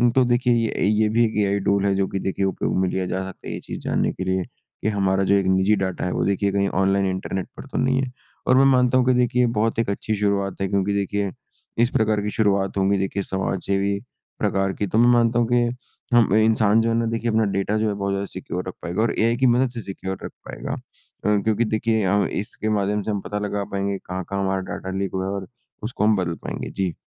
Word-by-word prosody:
तो 130 - +5
देखिए 120 0 +2
ये 115 -5 0
ये 110 0 +3
भी 115 +2 +3
एक 110 -1 -3
एआई 100 +1 +1
टूल 100 0 +2
है 100 - +3
जो 95 0 +1
कि 95 - -3
देखिए 95 +1 -1
उपयोग 95 - -1
में 95 - +2
लिया 95 0 -1
जा 95 +1 -2
सकता 95 - -12
है, - - -4
ये - - -4
चीज़ - - -7
जानने - - 0
के 95 - -5
लिए 95 0 0 0.4
कि - - -1
हमारा 95 -2 +1
जो 95 - +3
एक 100 -1 +2
निजी 95 +3 +3
डेटा 95 -3 -2
है 90 - -1
वो - - 0
देखिए 100 0 +1
कहीं 100 0 +1
ऑनलाइन 95 +1 +2
इंटर्नेट 95 0 -3
पर - - -8
तो - - -3
नहीं 130 +1 +2
है 130 -2 -3 0.4
और 130 - +5
मैं 135 - +6
मानता 125 -1 +4
हूँ 125 - +3
कि 130 - +4
देखिए 125 0 +2
बहुत 110 +1 +1
ही - - +4
अच्छी 110 +2 -1
शुरुआत 100 -2 0
है, 95 - +1
क्योंकि 100 +1 0
देखिए 100 0 -1 0.5
इस 120 - +2
प्रकार 110 -3 +1
की 105 - -2
शुरुआत 100 -3 +1
होगी 100 +1 +2
देखिए 95 +1 -1
समाज 95 -1 -2
सेवी 100 0 0 0.4
प्रकार 95 -2 +1
की, 105 - -2
तो 105 - -1
मैं 120 +1 +6
मानता 120 0 +3
हुँ 120 - +2
कि 120 -1 +3 0.5
हम 115 -5 +5
इंसान 110 0 +4
जो 115 - +1
है 115 - +1
ना 115 0 +1
देखिए 115 +1 -1
अपना 110 0 +3
डेटा 100 +2 0
जो 110 0 +1
है 105 - 0
बहुत 100 0 -2
ज़्यादा 100 0 -1
सिक्योर 90 0 -5
रख 95 - -4
पाएगा 90 +5 -1
और 115 - +2
एआई 115 +1 +3
की 130 - +2
मदद 125 +2 +3
से 120 -2 -5
सिक्योर 95 -2 -5
रख - - -5 0.2
पाएगा - - -5
अ, 105 0 -3
क्योंकि 110 +1 +2
देखिए 110 -1 0
हम 100 +2 +2
इसके 110 +1 -4
माध्यम 105 +1 0
से 110 - -2
हम 100 - -2
पता 105 +3 -4
लगा 100 0 -2
पाएँगे 100 0 -1
कहाँ-कहाँ 95 +1 -4
हमारा 95 0 0
डेटा 95 0 -5
लीक 100 -1 -2
हुआ 95 0 -1
है 95 - -2
और 100 -1 -4 0.4
उसको 110 -2 -2
हम 110 0 +4
बदल 90 -4 -1
पाएँगे, - - -5
जी। 95 -3 -2
100 Hz, 250 wpm, -23 LUFS, 95-110 Hz, 0.5 s, मैं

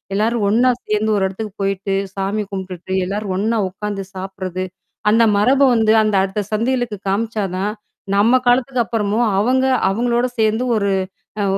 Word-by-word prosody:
எல்லாரும் 220 0 +1
ஒன்னா 240 +5 +4 0.2
சேர்ந்து 215 +1 +1
ஒரு 195 - +1
இடத்துக்கு 195 +1 -6
போயிட்டு, 195 0 -1 0.2
சாமி 195 +2 -1
கும்பிட்டுட்டு 190 -1 -5
எல்லாரும் 200 +1 -3
ஒன்னா 220 +2 0
உக்காந்து 195 +1 -5
சாப்பிடுறது, 185 -1 -5 0.5
அந்த 230 +2 +5
மரப 260 +7 +3
வந்து 220 -1 +3
அந்த 215 -2 +1
அடுத்த 195 +2 -2
சந்ததிகளுக்கு 235 0 0
காமிச்சாதான், 205 -2 -1 0.4
நம்ம 225 +5 +4
காலத்துக்கு 250 0 +2
அப்புறமும் 215 +2 0
அவங்க 260 +5 +2 0.2
அவங்களோட 240 +4 +1
சேர்ந்து 220 +2 +2
ஒரு 200 -2 +1 0.5
அ - - +1
210 Hz, 140 wpm, -19 LUFS, 195-230 Hz, 0.5 s, அந்த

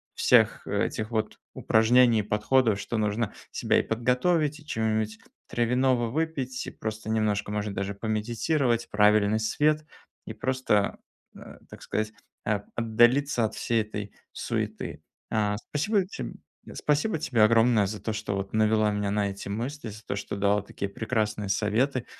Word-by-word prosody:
всех - - +4
этих 110 +1 -2
вот 110 -1 -2 0.2
упражнений 115 +1 +4
и - - +2
подходов, 105 +1 +2
что 115 - -3
нужно 105 +1 0 0.2
себя - - +1
и - - 0
подготовить, 145 +7 +1
и 150 - -17
чего-нибудь 110 -4 -1 0.3
травяного 120 0 +1
выпить, 135 -3 -2
и - - -5
просто 110 0 -5
немножко, 105 -2 0
может, 105 -1 -2
даже 100 +1 -3
помедитировать, 115 +4 0
правильный 105 +1 +4
свет 150 +7 +1 0.4
и - - -6
просто, 130 -6 0 0.4
а, - - -12
так - - -12
сказать, 110 0 -2 0.3
а, 105 -2 0
отдалиться 120 +3 +3
от 110 - -3
всей 115 -1 +1
этой 105 -1 -6 0.2
суеты, - - -4 0.3
а. 105 -2 +1
Спасибо 185 - 0
тем - - -6 0.4
спасибо 150 +4 0
тебе 120 -7 +2
огромное 115 -1 +5
за 105 +1 -6
то, 110 - -2
что 100 -1 -3
вот 95 +1 -5
навела 110 0 +3
меня 105 -1 -1
на 100 -1 +1
эти 100 0 -7
мысли, 120 +4 -4
за 105 +2 -10
то, - - -3
что 100 0 -5
дала 100 +1 +2
такие 100 0 -5
прекрасные 105 -2 -2
советы. 115 +6 +1
110 Hz, 150 wpm, -27 LUFS, 105-125 Hz, 0.4 s, огромное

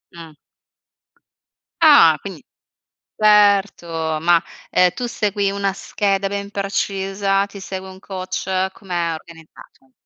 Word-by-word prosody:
Mh. 165 -2 -11 1.5
Ah, - - +7
quindi, - - -9 0.8
certo. 205 -3 +4 0.3
Ma, 170 0 +3 0.3
ehm, 180 0 +4
tu 245 -1 -4
segui 205 -3 -1
una 200 0 -1
scheda 195 0 -1
ben 200 0 -5
precisa? 195 0 -1
Ti 200 0 -12
segue 190 0 -7
un 190 0 -12
coach? 185 -2 -5 0.3
Com'è 175 -4 -3
organizzato? 160 -4 -15
195 Hz, 105 wpm, -20 LUFS, 180-200 Hz, 1.5 s, Ah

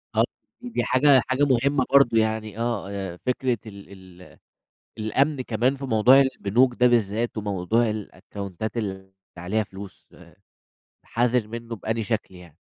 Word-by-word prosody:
آه، - - +4 0.4
دي 245 -1 -3
حاجة 130 0 +4
حاجة 130 +2 +1
مهمّة 135 0 +2
برضه 135 -5 +5
يعني 110 -1 -1
آه، 115 -5 -2
آآ 95 -3 -5
فكرة 125 -1 0
ال 95 -3 -13
ال - - -16 0.6
الأمن 135 +7 0
كمان 125 +4 0
في 135 - -8
موضوع 125 +3 +5
البنوك 125 -1 +2
ده 125 - +6
بالذات 115 -1 +1
وموضوع 105 +3 0
الأكاونتات 100 0 -6
اللي 95 -3 -5 0.2
عليها 90 +5 -1
فلوس، 95 -1 -12 1.0
حَذِر 120 -1 0
منه 115 +1 -7
بأنهي 110 +2 -3
شكل 105 -3 -3
يعني؟ 85 -4 -15
110 Hz, 135 wpm, -24 LUFS, 100-125 Hz, 1.0 s, ده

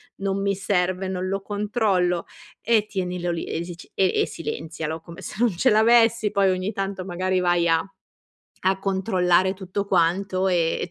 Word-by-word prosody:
non 195 0 -2
mi 200 0 +1
serve, 185 -1 0
non 185 0 -3
lo 195 +1 -2
controllo". 205 -4 0 0.4
E 220 -2 +2
tienilo 180 -3 -3
lì 170 - -3
e 165 - -3
si 175 0 -7
c 175 - -15
e 190 -1 +2
e - - +2
silenzialo 160 0 -5
come 170 +2 -11
se 175 - -7
non 235 -6 +2
ce 255 +9 +3
l'avessi, 225 -1 +4
poi 200 -1 +3
ogni 185 +2 -1
tanto 195 -2 -4
magari 185 0 -1
vai 175 -1 +2
a 165 -1 +3 0.8
a 190 0 +3
controllare 190 -2 +2
tutto 190 +1 -4
quanto, 185 +1 +1
e 170 -3 +1
e - - -4
185 Hz, 175 wpm, -24 LUFS, 175-200 Hz, 0.8 s, l'avessi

